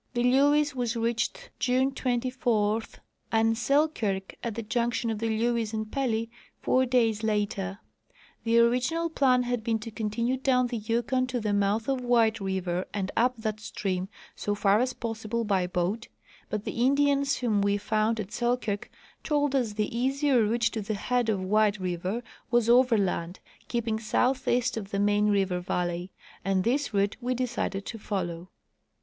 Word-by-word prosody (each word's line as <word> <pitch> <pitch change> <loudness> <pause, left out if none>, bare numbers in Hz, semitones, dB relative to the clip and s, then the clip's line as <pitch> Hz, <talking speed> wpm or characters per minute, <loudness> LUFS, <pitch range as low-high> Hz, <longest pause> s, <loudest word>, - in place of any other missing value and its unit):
The 240 - +1
Lewes 285 +3 +4
was 245 -2 -2
reached 230 +1 -2
June 260 +2 +2
24 240 -4 0 0.5
and 225 0 +3
Selkirk, 240 -7 0
at 230 -3 -3
the 230 - -4
junction 235 +1 0
of 215 - -3
the 225 0 -1
Lewes 225 0 0
and 215 0 -3
Pelly, 230 -5 0 0.3
four 260 0 +2
days 230 -4 +2
later. 205 -3 -1 0.7
The 230 0 +2
original 255 +8 +2
plan 255 -5 +3
had 245 -2 -2
been 225 0 +1
to 220 +1 -8
continue 230 +4 -1
down 255 -1 +2
the 240 -1 -3
Yukon 235 +4 0
to 255 -1 -2
the 210 -2 -1
mouth 205 +2 +1
of 270 -2 0
White 230 -2 +3
river 190 -2 -2
and 195 -2 -3
up 250 +2 +2
that 215 -1 -3
stream 190 -3 -3 0.3
so 205 - -2
far 205 0 +3
as 255 +1 0
possible 230 0 -3
by 195 -4 +1
boat, 185 +6 -2 0.4
but 210 -1 -3
the 235 - -1
Indians 280 +1 +3
whom 220 -5 +1
we 200 0 +2
found 215 +2 0
at 205 -1 -5
Selkirk 240 -4 -1 0.3
told 290 -2 +1
us 240 -6 +1
the 210 +2 -2
easier 270 +1 +2
route 225 +2 +1
to 220 - -2
the 210 +1 -3
head 245 +3 0
of 195 -3 0
White 210 +1 +3
river 185 +5 -2 0.3
was 240 -2 +2
overland, 215 -8 +3 0.3
keeping 230 -2 -1
southeast 250 +1 +1
of 200 -3 -5
the 200 - -2
main 205 +1 +3
river 195 -3 +1
valley; 175 0 -2 0.3
and 195 -1 +1
this 275 +5 0
route 200 0 +1
we 250 +1 -1
decided 235 -5 -2
to 225 - -6
follow. 180 -4 -4
225 Hz, 165 wpm, -28 LUFS, 205-250 Hz, 0.7 s, Lewes